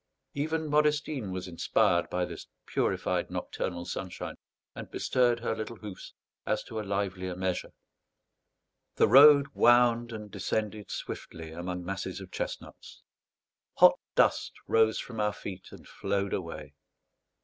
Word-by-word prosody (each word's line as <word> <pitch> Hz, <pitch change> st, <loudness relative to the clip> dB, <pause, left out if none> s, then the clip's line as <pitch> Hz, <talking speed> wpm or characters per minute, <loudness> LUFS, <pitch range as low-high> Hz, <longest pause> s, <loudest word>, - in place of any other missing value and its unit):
Even 160 Hz, +2 st, -1 dB
Modestine 150 Hz, -6 st, +1 dB
was 95 Hz, 0 st, -4 dB
inspired 85 Hz, 0 st, +1 dB
by 90 Hz, 0 st, 0 dB
this 85 Hz, -2 st, -9 dB, 0.2 s
purified -, -, 0 dB
nocturnal 85 Hz, -2 st, -4 dB
sunshine, 90 Hz, 0 st, -5 dB, 0.4 s
and -, -, -8 dB
bestirred 120 Hz, -2 st, +1 dB
her 115 Hz, -1 st, -1 dB
little 110 Hz, +1 st, -5 dB
hoofs 105 Hz, -3 st, -10 dB, 0.3 s
as -, -, -1 dB
to 110 Hz, -, -6 dB
a -, -, -1 dB
livelier 95 Hz, -3 st, -2 dB
measure. 95 Hz, 0 st, -2 dB, 1.3 s
The -, -, +4 dB
road 140 Hz, 0 st, +8 dB
wound 120 Hz, -1 st, +4 dB
and 105 Hz, -2 st, -7 dB
descended 105 Hz, -2 st, -3 dB
swiftly 80 Hz, -1 st, -6 dB
among 90 Hz, +2 st, -5 dB
masses 95 Hz, 0 st, -4 dB
of 95 Hz, -2 st, -10 dB
chestnuts. -, -, -7 dB, 0.7 s
Hot -, -, +7 dB, 0.2 s
dust -, -, +3 dB
rose 110 Hz, -1 st, +3 dB
from 115 Hz, -3 st, -6 dB
our 105 Hz, -1 st, +1 dB
feet 95 Hz, -2 st, -8 dB
and -, -, -13 dB
flowed 100 Hz, 0 st, -2 dB
away. 85 Hz, -3 st, -5 dB
105 Hz, 130 wpm, -29 LUFS, 90-120 Hz, 1.3 s, road